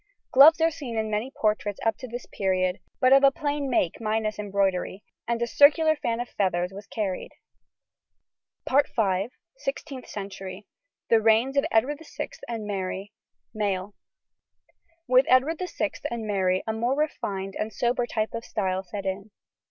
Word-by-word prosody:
Gloves 295 +5 +8
are 325 0 +4
seen 250 -7 -6
in 220 0 -1
many 215 +5 -1
portraits 210 -5 -1
up 225 -1 +2
to 255 - -8
this 245 +1 -7
period, 185 -1 0 0.2
but 255 0 +5
of 275 0 +6
a 275 - +8
plain 285 0 -2
make 210 -5 0
minus 215 -1 -1
embroidery, 195 -1 -1 0.2
and 235 0 0
a 235 - +1
circular 310 +5 +5
fan 235 -5 -2
of 245 - -3
feathers 180 -3 -1
was 200 +1 -10
carried. 200 -5 -3 2.3
SIXTEENTH 275 - -5
CENTURY. 195 -1 -7 0.4
THE 225 -1 +5
REIGNS 225 +5 +3
OF 280 - +3
EDWARD 275 +7 +2 0.2
VI - - -2 0.2
AND 230 -3 -4
MARY. 195 0 -4 0.4
MALE. 200 -2 -2 1.1
With 255 +1 +5
Edward 275 +6 +4
VI 365 - -2 0.2
and 235 -2 -4
Mary 190 -3 +1
a 220 - -1
more 235 +4 0
refined 195 -10 -2
and 220 - -3
sober 240 +2 0
type 215 -2 -2
of 230 0 -4
style 190 -5 -1
set 195 +2 -7
in. 195 +2 -3
220 Hz, 150 wpm, -26 LUFS, 195-255 Hz, 2.3 s, Gloves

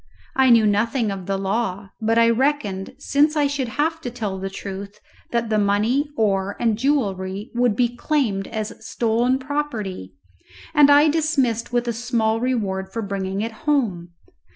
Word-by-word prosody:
I 265 -1 +4
knew 230 -2 +6
nothing 220 +2 +1
of 190 -2 -6
the 195 0 0
law; 195 -1 -2
but 225 +1 +1
I 230 0 +6
reckoned, 230 -6 -1
since 290 +2 +2
I 295 -1 +3
should 280 -2 -1
have 320 +7 -1
to 250 - -4
tell 215 -6 -4
the 195 +1 -4
truth, 200 +1 -7 0.3
that 235 -1 -1
the 215 - +3
money, 215 +8 +1
ore, 200 -2 0
and 230 -2 +2
jewellery 205 -6 -1
would 240 -3 +2
be 240 +1 +1
claimed 240 -10 0
as 215 -1 -4
stolen 235 +3 +1
property, 235 - -4 0.6
and 295 -2 +6
I 290 +2 +7
dismissed 280 -8 +1
with 240 0 0
a 235 - 0
small 225 -1 0
reward 200 -6 -2
for 230 +1 -3
bringing 195 0 -3
it 225 +1 -2 0.2
home. 190 -12 0
230 Hz, 165 wpm, -22 LUFS, 200-260 Hz, 0.6 s, I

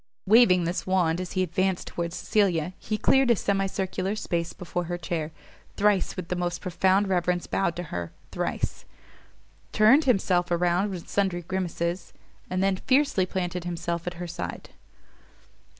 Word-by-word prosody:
Waving 195 -4 +6
this 170 +3 -2
wand 180 -2 +2
as 180 - -6
he 185 - +1
advanced 185 +1 0
towards 170 -1 -4
Cecilia, 185 -5 +1
he 215 - -2
cleared 265 +3 +3
a 235 - +6
semi 195 -1 0
circular 190 +1 -2
space 170 -5 -2
before 175 0 -4
her 175 +1 -3
chair, 165 -2 -3 0.5
thrice 205 -2 +2
with 185 -3 -5
the 180 - 0
most 175 0 -2
profound 190 +2 +2
reverence 180 -1 0
bowed 170 -4 0
to 175 - -4
her, 85 -2 -4 0.2
thrice - - -3 0.9
turned 230 +9 +5
himself 190 -7 +2
around 175 +3 +1
with 180 -4 -7
sundry 190 -3 0
grimaces, 175 0 -3 0.4
and 185 +1 0
then 195 -1 +2
fiercely 260 -6 +2
planted 180 -2 -3
himself 170 0 -3
at 175 - -3
her 175 +1 -5
side. 170 - -6
180 Hz, 155 wpm, -26 LUFS, 175-195 Hz, 0.9 s, Waving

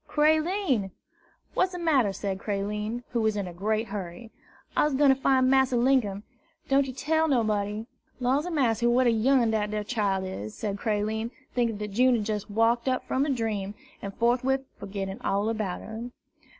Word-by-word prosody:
"Creline!" 310 - +2 0.6
"What's 370 0 +1
de - - -4
matter?" 290 - +2
said 195 -1 -4
Creline, 210 +3 -3
who 235 - -1
was 220 -1 +1
in 200 -2 -2
a 175 - -7
great 215 +4 -1
hurry. 200 +2 -6 0.4
"I's 295 -2 +2
gwine 285 +1 +5
to 270 - +6
fine 265 -1 +3
Massa 265 -1 +3
Linkum, 235 -6 +2 0.4
don' 275 +1 +4
yer 265 - -5
tell 315 +5 +1
nobody. 215 -5 0 0.3
Law's 265 +6 +1
a - - -2
massy, 240 - +1
what 250 +2 +3
a 240 - +5
young 250 +3 +3
un 225 - +1
dat 210 -1 0
ar 210 - -1
chile 200 -4 -1
is!" 110 - -6
said 205 -2 -3
Creline, 220 +1 -1 0.2
thinking 235 -3 0
that 210 0 -5
June 250 +4 +4
had 215 -3 -1
just 210 -1 -3
waked 230 +3 +2
up 255 - -1
from 275 +3 +1
a - - -1
dream, 215 -6 -2 0.3
and 200 - -5
forthwith 255 +3 +2 0.2
forgetting 195 +2 -5
all 200 0 0
about 215 -5 -2
her. 225 +2 -7
225 Hz, 185 wpm, -27 LUFS, 205-260 Hz, 0.6 s, to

